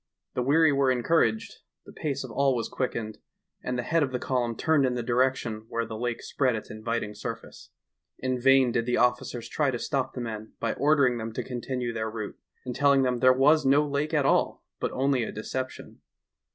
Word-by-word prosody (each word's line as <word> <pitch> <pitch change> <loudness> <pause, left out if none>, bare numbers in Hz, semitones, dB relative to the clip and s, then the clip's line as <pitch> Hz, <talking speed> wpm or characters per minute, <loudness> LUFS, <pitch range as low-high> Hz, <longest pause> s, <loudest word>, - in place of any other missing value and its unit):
The - - -1
weary 145 +4 +4
were 135 -1 +2
encouraged, 125 -3 +1 0.3
the - - -13
pace 145 -4 -3
of 130 - -8
all 135 +1 +2
was 115 -2 -2
quickened 110 -4 -3 0.4
and 125 0 -3
the 120 - -2
head 165 +6 +1
of 140 -3 0
the 125 - -1
column 120 -3 -1
turned 155 -3 +2
in 125 -1 +1
the 120 - -2
direction 120 -3 0
where 115 0 -1
the 110 - -7
lake 120 +1 -3
spread 130 -4 0
its 110 - -7
inviting 110 -1 -3
surface. 105 - -8 0.5
In 130 -1 -2
vain 135 -1 +5
did 115 0 -1
the 125 - +1
officers 125 -1 0
try 150 -3 0
to 125 - -1
stop 135 +2 -2
the - - -4
men 110 -2 -6
by 115 - -1
ordering 140 -5 +3
them 115 0 -4
to - - -3
continue 125 -1 -4
their 110 -1 -2
route, 110 -2 -6 0.3
and 125 -1 -4
telling 140 -2 +4
them 125 -1 0
there 130 +1 +6
was 145 +5 +4
no 140 +3 +4
lake 145 +2 -1
at 150 -4 +2
all - - +1 0.2
but - - -2
only 135 -1 +1
a - - -4
deception. 130 +4 -6
125 Hz, 205 wpm, -27 LUFS, 115-135 Hz, 0.5 s, there